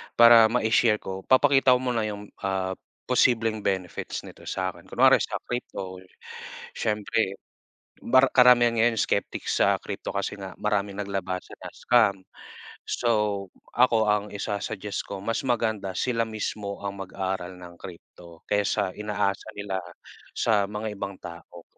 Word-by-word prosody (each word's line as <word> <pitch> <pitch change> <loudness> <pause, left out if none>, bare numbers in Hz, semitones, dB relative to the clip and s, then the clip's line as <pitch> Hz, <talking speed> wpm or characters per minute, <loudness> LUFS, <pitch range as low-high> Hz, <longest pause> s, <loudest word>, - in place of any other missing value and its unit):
para 115 -1 +8
ma-ishare 110 -1 +2
ko, 95 0 -5
papakita 135 -1 +5
ko - - 0
muna 120 -3 0
yung, 105 -1 -7
ah, 95 -1 -1 0.3
posibleng 115 -3 +2
benefits 95 -3 -3
nito - - -13
sakin. 95 -1 -4
Kunwari - - +5
sa - - -3
crypto, 100 -6 -5 0.8
siyempre, 105 -1 -1 0.6
mar 130 +2 +5
karamihan 125 -2 +6
ngayon 115 0 +3
skeptics - - -1
sa - - +4
crypto - - -6
kasi - - -2
nga 95 -1 -8
maraming 105 -1 -1
naglabasan 95 -2 -4
na - - -7
scam. 110 -5 +3 0.7
So, 105 -4 0 0.3
ako 120 -3 +4
ang 105 0 +1
isa-suggest 100 0 -4
ko, 100 - -5
mas 115 - -1
maganda 110 -6 -1
sila 115 -2 0
mismo 105 -2 -5
ang 100 0 -4
mag-aral 95 -1 -4
ng 90 -1 -11
crypto. 85 -1 -13
Kaysa 100 -2 +1
inaasa 105 -2 -2
nila 100 -2 -3 0.6
sa 105 -3 +2
mga 105 +1 -4
ibang 100 -1 -6
tao, 85 0 -11
105 Hz, 130 wpm, -26 LUFS, 95-115 Hz, 0.8 s, para